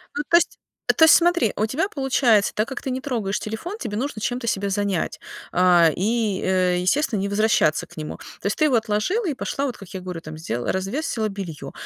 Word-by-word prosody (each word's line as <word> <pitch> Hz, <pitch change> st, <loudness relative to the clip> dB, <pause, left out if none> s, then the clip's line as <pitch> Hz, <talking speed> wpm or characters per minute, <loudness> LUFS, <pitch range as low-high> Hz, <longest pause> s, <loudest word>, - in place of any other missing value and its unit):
Ну, 290 Hz, -, -1 dB
то 340 Hz, -, +7 dB
есть 345 Hz, -, 0 dB, 0.4 s
то 320 Hz, -, +8 dB
есть 320 Hz, -, +8 dB
смотри, 345 Hz, -, +3 dB
у 215 Hz, -, +1 dB
тебя 280 Hz, -, -1 dB
получается, 265 Hz, -, +2 dB
так 215 Hz, +2 st, 0 dB
как 265 Hz, -, -6 dB
ты 265 Hz, -, -3 dB
не 255 Hz, -, -2 dB
трогаешь 230 Hz, -8 st, -2 dB
телефон, 275 Hz, -, -5 dB
тебе 205 Hz, -, -5 dB
нужно 245 Hz, -3 st, -3 dB
чем-то 245 Hz, +2 st, -2 dB
себя 200 Hz, -2 st, 0 dB
занять, 195 Hz, -3 st, -1 dB, 0.4 s
а, 175 Hz, -2 st, +5 dB
и, 215 Hz, 0 st, 0 dB
э, 185 Hz, -1 st, +2 dB
естественно, 225 Hz, +4 st, +1 dB
не 200 Hz, -, -1 dB
возвращаться 200 Hz, -7 st, +2 dB
к -, -, -17 dB
нему. 155 Hz, -1 st, -6 dB, 0.2 s
То -, -, -2 dB
есть 200 Hz, -, -1 dB
ты 310 Hz, -, +3 dB
его 280 Hz, -5 st, +3 dB
отложила 225 Hz, -, 0 dB
и 320 Hz, -, 0 dB
пошла, 275 Hz, +1 st, -3 dB
вот 255 Hz, -5 st, -4 dB
как 195 Hz, -, -11 dB
я 190 Hz, -, -5 dB
говорю, 180 Hz, -2 st, -6 dB
там 155 Hz, -1 st, -9 dB
сделала 120 Hz, -7 st, -3 dB
развесила 215 Hz, +3 st, -2 dB
бельё, 170 Hz, -9 st, -7 dB
215 Hz, 220 wpm, -23 LUFS, 190-270 Hz, 0.4 s, то